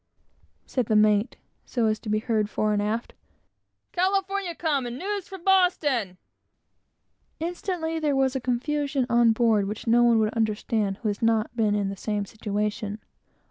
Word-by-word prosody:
said 250 -5 -1
the 215 - +2
mate, 210 +2 +3 0.3
so 240 -3 -1
as 215 0 +1
to 215 - -8
be 215 - +2
heard 215 -2 0
fore 215 0 0
and 205 - +1
aft; 220 +3 -2 0.8
"California 385 0 0
come, 290 -7 0
and 240 +1 -5
news 400 +3 -3
from 385 -3 -10
Boston!" 300 - +2 1.2
Instantly 330 -1 -3
there 295 -3 +1
was 270 0 +1
a 265 - -1
confusion 275 +2 -1
on 235 -1 +5
board 220 -3 +2
which 210 +2 -5
no 235 +1 +4
one 235 -1 +5
could 215 -1 +2
account 215 -2 -1
for - - -29
who - - 0
has 205 - -4
not 225 0 +1
been 215 -3 +2
in 200 -1 0
the 195 - -5
same 205 +1 -2
situation. 210 0 -3
230 Hz, 170 wpm, -26 LUFS, 210-300 Hz, 1.2 s, on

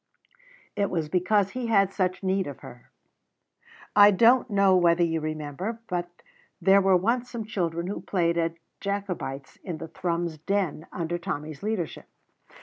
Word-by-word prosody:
It 200 -1 0
was 160 -4 -2
because 190 +3 +2
he 250 0 -3
had 195 -3 +3
such 185 -1 -1
need 190 0 0
of 140 - -8
her. 120 - -13 1.1
I 205 0 +9
don't 235 +5 +4
know 200 -2 +4
whether 175 -1 +4
you 165 -1 0
remember, 155 +8 -4
but 175 -3 -2 0.5
there 195 +1 +5
were 190 -1 +4
once 235 +6 0
some 230 -3 -5
children 170 -5 -2
who 195 - -4
played 170 -3 0
at 165 -1 0 0.2
Jacobites 185 -9 -4
in 175 -5 -5
the 160 - -8
Thrums 170 -2 -2
Den 180 -3 -1
under 175 0 -3
Tommy's 155 -3 -5
leadership. 210 -6 -3
185 Hz, 150 wpm, -26 LUFS, 165-200 Hz, 1.1 s, I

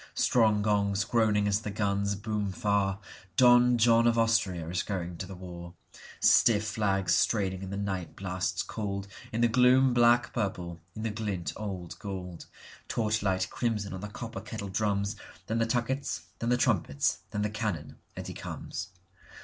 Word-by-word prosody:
Strong 110 -4 +3
gongs 100 -1 +1
groaning 105 -2 +2
as 100 0 +2
the 105 - -4
guns 100 -1 0
boom 105 -1 -2
far, 100 0 0 0.4
Don 125 -1 +6
John 115 0 +5
of 115 0 +3
Austria 110 -8 +1
is 85 +1 -1
going 90 -3 -4
to 95 - -5
the 95 - -8
war, 90 -1 -9 0.4
Stiff 105 -3 +5
flags 100 -4 +1
straining 95 -4 +1
in 95 - -6
the 100 - -4
night 95 -4 -3
blasts 95 -1 -2
coldIn 100 -2 -4 0.3
the 120 - +5
gloom 125 +2 +5
black 120 0 +4
purple, 90 -6 -3 0.2
in 110 - -5
the 115 - -1
glint 105 -5 -3
old 95 -5 -6
gold, 90 -4 -7 0.4
Torchlight 105 -4 0
crimson 105 -5 -2
on 95 - -6
the 105 - -4
copper 105 - -7
kettle 100 - -6
drums, 100 +1 -1 0.3
Then 115 +1 -1
the 115 - +2
tuckets, 130 +4 -1 0.2
then 115 - -1
the 125 - +3
trumpets, 95 - +1
then 105 - -2
the 105 - -1
cannon, 105 -9 -3 0.2
and - - -6
he - - -6
comes. 95 - -6
105 Hz, 165 wpm, -29 LUFS, 95-115 Hz, 0.4 s, Don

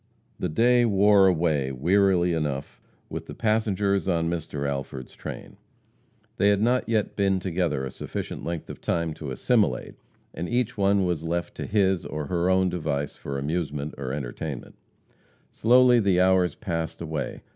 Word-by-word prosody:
The - - -1
day 120 +8 +4
wore 100 -2 +5
away, 80 -6 +1
wearily 90 +5 +2
enough, 75 -4 -3 0.3
with - - -6
the - - -8
passengers 100 -3 +1
on 85 -2 +1
Mr. 75 -4 -3
Alford's 70 -2 -5
train. - - -8 0.8
They 100 - +4
had 100 -1 +3
not 120 +3 +1
yet 110 -3 0
been 95 -2 +2
together 85 -7 -1
a 65 - -5
sufficient - - -6
length 85 -2 -4
of - - -11
time 85 -2 -1
to 75 -2 -7
assimilate, 80 - +1 0.4
and 85 - -4
each 120 -1 0
one 100 -1 +2
was 85 -3 -1
left 85 +1 -2
to - - -4
his, 95 -4 +2
or 75 -1 -4
her, 85 +4 0
own 95 0 +3
device 75 -5 -2
for 70 - -5
amusement 75 0 -3
or 65 -2 -5
entertainment. 70 0 -5 0.8
Slowly 125 +1 +5
the 100 -4 +2
hours 95 -1 +3
passed 80 -2 -4
away. 80 -2 -4
85 Hz, 155 wpm, -25 LUFS, 75-100 Hz, 0.8 s, wore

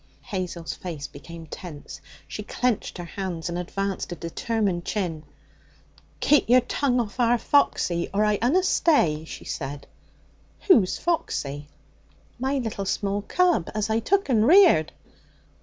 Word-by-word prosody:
Hazel's 180 -6 -4
face 165 -6 -6
became 165 +3 -10
tense. 155 -1 -9 0.3
She - - -6
clenched 235 0 -2
her 175 - -6
hands 175 -2 -4
and 170 - -3
advanced 195 +2 -3
a - - -3
determined 185 +2 -2
chin. 175 -7 -2 1.0
'Keep 295 -5 +4
yer 250 +1 +7
tongue 250 +1 0
off 225 0 -4
our 240 0 +4
Foxy, 185 -10 +1
or 210 +2 +2
I 210 -1 +1
unna 300 +11 +3
stay!' 170 - +2
she - - -9
said. 140 -1 -5 0.8
'Who's 220 - +5
Foxy?' 145 - -2 0.7
'My 265 +2 0
little 225 -6 -3
small 200 +1 -1
cub 350 - +1
as 215 0 -1
I 220 - +2
took 395 - +1
and 230 -4 +3
reared.' 345 - +6
205 Hz, 140 wpm, -25 LUFS, 170-245 Hz, 1.0 s, yer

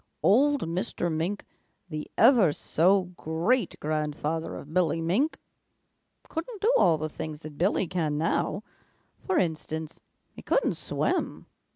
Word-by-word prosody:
"Old 280 +7 +4
Mr. 175 0 -2
Mink, 180 +6 -2 0.4
the 155 -3 -6
ever 225 - +6
so 185 +7 +2
great 175 +7 0
grandfather 155 +1 -2
of 150 +2 -9
Billy 165 -3 +2
Mink, 195 - 0 0.9
couldn't 365 +7 -5
do 445 +5 +3
all 165 - +5
the 155 +1 -3
things 155 0 -7
that 155 -2 -10
Billy 190 +2 +2
can 160 -4 -1
now. 165 +5 0 0.6
For 380 -3 -1
instance, 160 - -2 0.3
he - - -12
couldn't - - +1
swim. - - -2
170 Hz, 130 wpm, -27 LUFS, 155-215 Hz, 0.9 s, ever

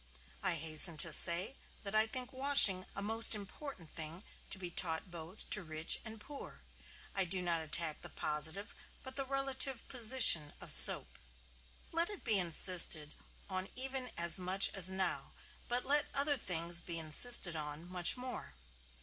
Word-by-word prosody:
I 185 -3 -3
hasten 160 +1 +2
to 160 +1 +1
say 180 - +6 0.3
that 200 -1 -7
I 215 +1 +2
think 255 +3 -4
washing 260 -9 +2
a 200 - -7
most 225 +2 +2
important 200 - -12
thing 165 +3 -7 0.3
to - - -4
be 180 -2 -10
taught 170 +1 -1
both 170 +4 -9
to 210 - 0
rich 155 -2 -1
and 220 -1 -10
poor. 280 +6 -12 0.5
I 195 - -2
do 185 +1 -2
not 170 -2 -4
attack 160 0 -3
the - - -9
positive 160 +7 -4 0.3
but 260 0 -12
the 275 -1 -6
relative 270 -2 -4
position 225 - +5
of - - -6
soap. - - +5 0.7
Let 335 +2 -2
it 410 -3 -12
be 215 -4 +2
insisted 170 -3 +2 0.3
on 185 -1 -8
even 260 0 -3
as 170 +2 +5
much 185 +2 0
as 185 -2 +5
now; 190 0 -3 0.3
but 245 +1 -5
let 290 +2 -1
other 285 +1 -1
things 170 -6 -2
be 170 -1 -5
insisted 165 +3 +1
on 150 +2 -7
much 180 +4 -1
more. 250 - -9
190 Hz, 160 wpm, -32 LUFS, 165-250 Hz, 0.7 s, say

